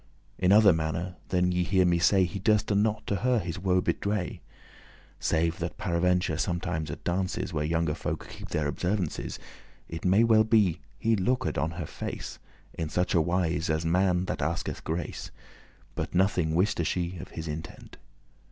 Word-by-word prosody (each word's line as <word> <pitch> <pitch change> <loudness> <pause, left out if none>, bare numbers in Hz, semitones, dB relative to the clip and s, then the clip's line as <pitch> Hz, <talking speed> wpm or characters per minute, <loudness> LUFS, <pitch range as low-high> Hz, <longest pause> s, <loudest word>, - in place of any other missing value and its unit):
In 90 0 +3
other 105 -2 +7
manner 80 +3 -2
than 90 0 +2
ye 90 0 +1
hear 95 +1 +3
me 85 -1 +3
say, 95 +2 +4
He 90 +2 -3
durste 105 +1 +2
not 105 +1 +1
to 100 - -1
her 125 +4 +2
his 90 -2 -3
woe 95 -1 +2
bewray, 100 -3 -1 0.8
Save 85 0 0
that 85 0 -4
paraventure 90 -4 +1
sometimes 85 -3 -2
at 70 - -7
dances, 90 0 -2
Where 75 -1 0
younge 80 -1 0
folke - - -4
keep - - -9
their 75 - -1
observances, 90 +4 -2 0.5
It 80 -1 -7
may 95 +5 +4
well 110 -1 +5
be 105 -7 +3 0.2
he 115 0 +2
looked 125 +6 0
on 80 - 0
her 85 - -3
face - - -6 0.3
In 80 -2 -3
such 90 +2 0
a 85 - +4
wise, 85 -1 0
as 80 +1 0
man 90 +1 +2
that - - -3
asketh 85 +5 -2
grace, 85 +2 -4 0.6
But - - -4
nothing 90 -4 +2
wiste 90 -1 +2
she 90 +2 -2
of - - -7
his 80 0 -6
intent. 75 +1 -7
90 Hz, 170 wpm, -28 LUFS, 80-95 Hz, 0.8 s, other